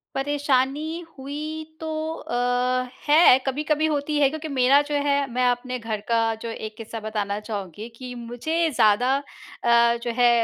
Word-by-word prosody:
परेशानी 290 +3 0 0.2
हुई 300 +4 -5 0.2
तो 320 - -5 0.3
अ, 245 0 0 0.2
है, 295 -3 +7
कभी-कभी 300 +3 0
होती 300 -1 -1
है। 280 -2 +5
क्योंकि 315 +2 -6
मेरा 275 0 +4
जो 290 0 -3
है, 285 -1 +3 0.2
मैं 250 +1 +1
अपने 250 +1 -1
घर 225 -2 -3
का 230 0 +3 0.2
जो 230 - -5
एक 220 -1 -6
किस्सा 225 0 -7
बताना 210 -2 -3
चाहूँगी 210 -1 -6
कि 250 +1 -8
मुझे 245 +8 -1
ज़्यादा 220 +5 +4 0.5
अ, 235 0 +5
जो 240 - -1
है 245 0 +6
255 Hz, 155 wpm, -24 LUFS, 235-290 Hz, 0.5 s, है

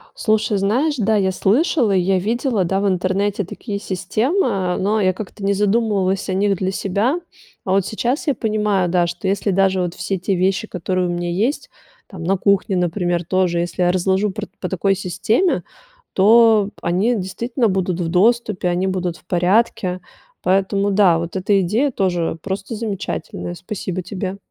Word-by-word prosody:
Слушай, 215 -1 +1
знаешь, 245 +11 +1
да, 220 -1 +2
я 190 -2 +2
слышала, 235 - +2
я 190 0 +2
видела, 225 0 0
да, 195 +3 0
в 205 - +1
интернете 195 +2 0
такие 200 +3 -6
системы, 200 - 0
но 210 +3 +1
я 185 -2 +2
как-то 205 +1 -8
не 200 +1 +2
задумывалась 200 -2 +1
о - - 0
них 195 +1 +1
для 190 +1 -1
себя. 205 - 0 0.4
А 185 - -3
вот 195 -1 +2
сейчас 245 +7 -2
я 285 - +2
понимаю, 210 -4 0
да, 175 0 +2
что 175 +2 -4
если 200 +1 0
даже 190 0 +2
вот 175 -1 -2
все 190 +2 -3
те 190 +2 -1
вещи, 190 +4 0
которые 185 0 -2
у - - -2
меня 175 0 -2
есть 245 - -1 0.4
там 185 -5 -9
на 190 +4 +1
кухне, 200 0 +1
например, 175 -1 0
тоже, 180 0 +1
если 175 +1 -1
я 175 - +3
разложу 190 +3 +1
пр - - -6
по 180 - -3
такой 195 +2 +1
системе, 215 - 0 0.5
то 215 0 +5
они 190 +8 +1
действительно 230 +5 -1
будут 185 -2 -1
в 165 - -1
доступе, 210 +1 +2
они 180 +2 0
будут 180 -2 -2
в - - -24
порядке. 185 0 +1 0.4
Поэтому, 195 +2 +1
да, 190 -5 +4
вот 170 +2 -5
эта 195 +1 +2
идея 220 +11 +1
тоже 175 -6 -1
просто 195 +3 -4
замечательная. 195 - -4
Спасибо 185 - -5
тебе. 190 +1 -5
195 Hz, 170 wpm, -20 LUFS, 180-215 Hz, 0.5 s, то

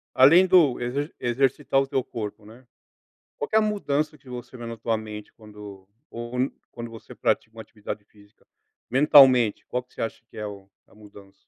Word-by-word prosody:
além 165 +8 +7
do 165 -10 +4
exer 140 +6 -3
exercitar 135 +2 +1
o 135 - -1
teu 135 -1 0
corpo, 105 -1 -7
né. 120 +4 -15 0.7
Qual 145 - -4
que 220 - -2
é - - +7
a - - +2
mudança 155 -8 -1
que 130 - -18
você 125 +1 -8
vê 120 - -8
na 115 -1 -6
tua 115 0 -1
mente 105 -1 -9
quando 105 -3 -12 0.2
ou 120 0 -7 0.4
quando 120 -1 -7
você 115 -1 -12
pratica 110 - -1
uma 110 - -8
atividade 105 -1 -8
física, 105 -1 -24 0.4
mentalmente, 130 -4 +6
qual 125 0 -3
que - - -30
você - - -7
acha 115 0 -4
que - - -15
é 105 - -4
o 100 -1 -11 0.2
a - - -23
mudança? 100 -2 -16
120 Hz, 195 wpm, -25 LUFS, 105-135 Hz, 0.7 s, além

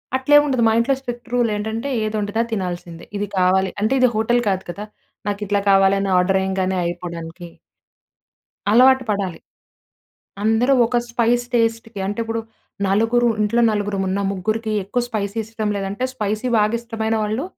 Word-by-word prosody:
అట్లేమి 290 +3 +5
ఉండదు. 260 -4 +1
మా 220 - +3
ఇంట్లో 265 +4 +2
స్పెక్ట్ 245 -2 -7
రూల్ 240 -2 +2
ఏంటంటే, 220 +5 -3
ఏది 215 0 -2
ఒండితే 205 +2 -2
అది 235 - -10
తినాల్సిందే. 175 -4 -5
ఇది 205 +1 -2
కావాలి 185 +1 +3
అంటే, 220 +5 +2
ఇది 255 - +5
హోటల్ 240 +3 +2
కాదు 190 -1 -1
కదా! 205 +4 -7 0.4
నాకు 205 0 -3
ఇట్లా 200 0 +1
కావాలి 195 0 +5
అని 195 - -1
ఆర్డర్ 190 +1 +2
ఎయ్యంగానే 190 0 -1
అయిపోవడానికి. 170 0 -6 1.3
అలవాటు 260 +3 +6
పడాలి. 195 -4 -2 1.0
అందరూ 225 +5 +3
ఒక 245 - -1
స్పైస్ 240 0 +1
టేస్ట్‌కి 225 -2 0
అంటే, 205 +2 -4
ఇప్పుడు 225 0 -2 0.5
నలుగురు 225 +5 +2
ఇంట్లో 210 +3 +2
నలుగురం 205 -2 -1
ఉన్నాం. 195 +1 -1
ముగ్గురికి 215 +3 -2
ఎక్కువ 205 +6 -1
స్పైసీ 210 -2 -3
ఇష్టం 220 -1 -3
లేదంటే, 200 +4 -3
స్పైసీ 215 0 -2
బాగా 215 +2 +2
ఇష్టమైన 225 -1 -2
వాళ్ళు 215 +7 -2
215 Hz, 155 wpm, -20 LUFS, 195-235 Hz, 1.3 s, అలవాటు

